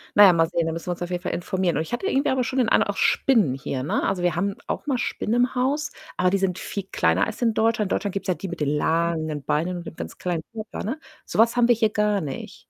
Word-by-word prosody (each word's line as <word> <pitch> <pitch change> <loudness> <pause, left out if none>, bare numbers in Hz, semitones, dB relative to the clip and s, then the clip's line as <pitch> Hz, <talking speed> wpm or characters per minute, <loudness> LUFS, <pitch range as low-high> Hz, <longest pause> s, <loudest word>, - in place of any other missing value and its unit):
Na 205 - +9
ja, 185 - +7
mal 165 -1 +3
sehen, 170 -2 0
da 165 - -1
müssen 165 +2 -6
wir - - 0
uns 175 - -13
auf 175 - -5
jeden 180 0 -2
Fall - - -3
informieren. 180 -1 -1
Und 160 - 0
ich 160 - -9
habe 240 - -2
hier 405 - 0
irgendwie 275 - +2
aber 260 -1 +1
schon 260 +2 -3
den 235 - +3
Eindruck - - +3
auch - - -10
Spinnen 215 - +3
hier, 135 -1 -4
ne? 145 - -1
Also, 180 -2 -1
wir 175 -2 +2
haben 195 +3 -1
auch - - -4
mal 270 - +1
Spinnen 230 -1 -1
im 245 +1 +2
Haus, 285 +4 0 0.3
aber 180 0 +3
die 195 - +3
sind 190 -2 0
viel 200 -2 -5
kleiner 80 +4 +2
als - - -7
in 230 -2 +2
Deutschland. 220 -3 +1
In - - +3
Deutschland 205 -3 -2
gibt's 195 -1 -4
ja 185 - +3
die 190 - -6
mit 175 - -6
den 145 - +1
langen 160 -1 0
Beinen 175 +4 0
und 175 - -8
mit - - -8
ganz - - -7
kleinen 170 -3 -2
Körper, 220 -1 -6
ne? 260 +9 -3 0.3
So - - -5
was 230 +2 +5
haben 240 -1 +4
wir 240 - +5
hier 220 -1 +2
gar 210 -2 +1
nicht. 140 -3 -7
190 Hz, 300 wpm, -24 LUFS, 170-230 Hz, 0.3 s, Na